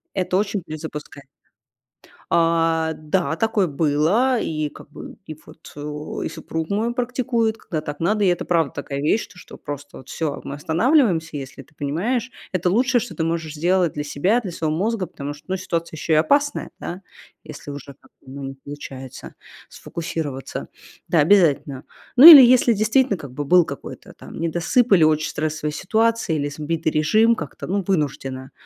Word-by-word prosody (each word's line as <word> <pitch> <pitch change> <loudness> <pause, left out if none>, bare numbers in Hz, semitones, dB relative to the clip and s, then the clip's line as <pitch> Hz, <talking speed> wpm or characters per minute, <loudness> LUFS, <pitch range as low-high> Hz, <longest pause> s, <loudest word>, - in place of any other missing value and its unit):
Это 185 -1 0
очень 200 -1 -1
перезапускает. 150 -3 -8 1.0
А, 165 -1 +2
да, 160 +1 -1
такое 215 -2 +1
было. 165 - +1
И 155 -2 -2
как - - -15
бы, - - -10
и 155 - -8
вот, 165 - -15
о, 150 +1 -6
и - - -3
супруг 160 0 -5
мой 225 +4 -1
практикует, 240 -2 -1
когда 155 -7 -5
так 145 -1 -7
надо. 205 +5 +1
И - - +3
это 175 -1 +1
правда 165 -4 +1
такая 140 -1 -5
вещь, 210 +9 +1
то 180 - -19
что - - -13
просто 145 0 -8
вот - - -14
всё, 155 -4 -3
мы 140 - -6
останавливаемся, 165 - +1
если 135 0 -8
ты 155 - -21
понимаешь. 210 - -2 0.2
Это 180 -1 0
лучшее, 245 +4 +2
что 245 - -7
ты 160 - -2
можешь 165 -2 -2
сделать 175 +1 +1
для 150 - -4
себя, 185 +12 +1
для 190 -5 -6
своего 155 -2 -2
мозга, 205 +1 -1
потому 145 -2 -7
что, 150 - -17
ну, 190 - -1
ситуация 170 -3 -4
еще 160 - -1
и - - +5
опасная, 285 - +1
да. 180 +3 -6 0.4
Если 145 - -9
уже 140 0 -9
как-то, - - -23 0.2
ну, 140 0 -8
не 135 0 -6
получается 135 -2 -10 0.3
сфокусироваться. 155 -5 -6 0.4
Да, 165 - +2
обязательно. 150 -5 +3 0.3
Ну 265 +5 +8
или 300 -5 +13
если 245 -1 +5
действительно 220 +1 +2
как 140 -5 -10
бы 145 +3 -5
был 175 +2 +5
какой-то 140 - -9
там - - -11
недосып 175 - +1
или 170 -4 +6
очень 155 0 +2
стрессовые 155 0 -3
ситуации, 225 -2 0
или 145 -1 -1
сбитый 155 +2 -2
режим, 215 +10 +3
как-то, 150 -8 -7
ну, 195 +1 -1
вынуждено, 135 -6 -2
165 Hz, 175 wpm, -22 LUFS, 150-205 Hz, 1.0 s, или